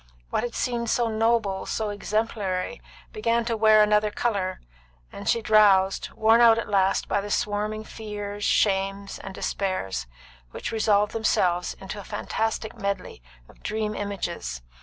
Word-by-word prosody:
What - - +1
had 240 -1 -4
seemed 235 -2 -1
so 235 -1 +1
noble, 220 -3 +1
so 215 -2 -2
exemplary, 205 -1 -2 0.3
began 230 +2 +1
to 230 -1 0
wear 215 -1 +6
another 210 0 +3
colour; 200 -4 -1 0.5
and 200 - -5
she 230 - +2
drowsed, 200 -3 +4
worn 225 +2 +5
out 230 -1 +7
at 230 - -2
last 195 -2 +2
by 200 - +1
the 205 - -6
swarming 210 +1 -1
fears, 205 -2 -6
shames, 195 -1 +1
and 190 0 -8
despairs, 95 - -2 0.4
which - - -5
resolved 210 -2 +2
themselves 180 -5 +1
into 195 +2 -8
a - - -8
fantastic 220 +3 -3
medley 200 - -4 0.3
of - - -20
dream 215 0 -2
images. 170 - -4
210 Hz, 145 wpm, -25 LUFS, 195-220 Hz, 0.5 s, out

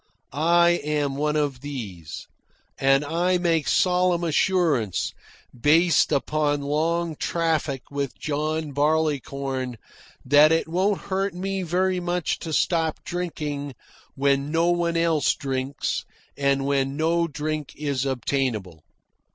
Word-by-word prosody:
I 170 +3 +3
am 145 -2 -1
one 150 +1 0
of 145 -4 -1
these, 105 - -7 0.5
and 135 +2 +3
I 175 +4 +1
make 165 -4 +1
solemn 180 -1 +2
assurance, 160 - +1 0.4
based 160 +8 +4
upon 145 0 0
long 160 +3 0
traffic 160 -5 -1
with 140 -2 -3
John 155 +1 -2
Barleycorn, 140 -4 -1 0.5
that 145 +4 +6
it 165 0 +2
won't 190 +4 0
hurt 195 0 -2
me 195 +1 -2
very 185 +1 0
much 175 -1 -1
to 160 - -6
stop 160 0 0
drinking 150 -6 -4 0.4
when 140 +1 +1
no 165 +2 +2
one 170 -1 0
else 165 -3 +2
drinks 135 -1 -3 0.3
and 140 -1 +1
when 140 0 0
no 165 +2 +1
drink 150 -1 -4
is 140 -3 -2
obtainable. 120 - -2
150 Hz, 120 wpm, -24 LUFS, 140-170 Hz, 0.5 s, that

